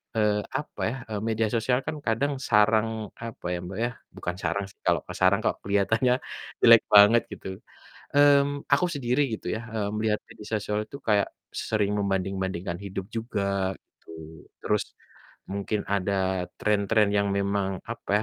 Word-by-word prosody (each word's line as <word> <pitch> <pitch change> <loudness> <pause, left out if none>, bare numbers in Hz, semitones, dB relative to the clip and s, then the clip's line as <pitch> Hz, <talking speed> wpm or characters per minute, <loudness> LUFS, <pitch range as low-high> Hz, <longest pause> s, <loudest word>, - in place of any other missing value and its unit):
eee, 105 -1 +2
apa 145 +3 -4
ya, 125 - -4
eee, 105 -1 -2
media 110 0 +1
sosial 120 +2 +1
kan - - -2
kadang 135 +6 +1
sarang 110 -2 +2 0.2
apa 115 -5 -9
ya, - - -1
Mbak, 95 +2 -7
ya 120 - 0 0.3
bukan 90 - -4
sarang 100 0 -1
sih, - - -21
kalau - - +3
ke - - -6
sarang 95 +2 +4
kok - - 0
keliatannya 110 +5 +2 0.5
jelek 115 -1 +8
banget 105 +3 +8
gitu, - - -9 0.7
mmm, 145 0 +4
aku 140 - +4
sendiri 130 -1 0
gitu 110 - -6
ya, 110 - -3
eee, 105 -2 -1
melihat 110 -1 +1
media 110 -2 -12
sosial 105 0 -1
itu 140 - -9
kayak 105 -2 +3 0.2
sering 105 -2 -1
membanding-bandingkan 95 -2 -2
hidup 95 -1 -5
juga 100 -4 -1
gitu. - - -28 0.5
Terus - - +1 0.7
mungkin 100 +1 -2
ada 95 -2 0
tren-tren 105 0 +2
yang 100 0 +2
memang, 100 0 0 0.2
apa 115 - -6
105 Hz, 155 wpm, -26 LUFS, 100-115 Hz, 0.7 s, jelek